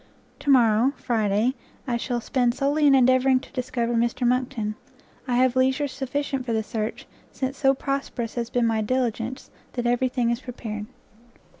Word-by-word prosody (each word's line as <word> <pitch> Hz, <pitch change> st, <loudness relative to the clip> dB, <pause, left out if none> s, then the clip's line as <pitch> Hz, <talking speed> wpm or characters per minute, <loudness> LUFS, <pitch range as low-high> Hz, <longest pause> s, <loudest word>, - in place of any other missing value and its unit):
To 285 Hz, -, -4 dB
morrow, 240 Hz, 0 st, +5 dB
Friday, 220 Hz, 0 st, +1 dB, 0.3 s
I 245 Hz, -, 0 dB
shall 240 Hz, 0 st, -2 dB
spend 245 Hz, 0 st, +1 dB
solely 290 Hz, +2 st, +2 dB
in 275 Hz, -, +6 dB
endeavouring 260 Hz, 0 st, +4 dB
to -, -, -14 dB
discover. 245 Hz, -2 st, -2 dB
Mr 235 Hz, +1 st, +1 dB
Monckton; 245 Hz, -4 st, 0 dB, 0.5 s
I 245 Hz, -, 0 dB
have 255 Hz, 0 st, +3 dB
leisure 265 Hz, +3 st, +2 dB
sufficient 270 Hz, 0 st, -3 dB
for 240 Hz, -2 st, -2 dB
the 220 Hz, 0 st, 0 dB
search, 215 Hz, 0 st, -4 dB, 0.3 s
since 265 Hz, 0 st, -3 dB
so 270 Hz, -1 st, +3 dB
prosperous 270 Hz, -4 st, -3 dB
has 235 Hz, -1 st, -3 dB
been 245 Hz, -1 st, +1 dB
my 225 Hz, -1 st, +1 dB
diligence, 240 Hz, +1 st, -2 dB, 0.2 s
that 245 Hz, -1 st, -3 dB
every 245 Hz, +2 st, +2 dB
thing 245 Hz, -2 st, 0 dB
is 235 Hz, -, -1 dB
prepared! 220 Hz, -4 st, -6 dB
245 Hz, 165 wpm, -25 LUFS, 230-260 Hz, 0.5 s, in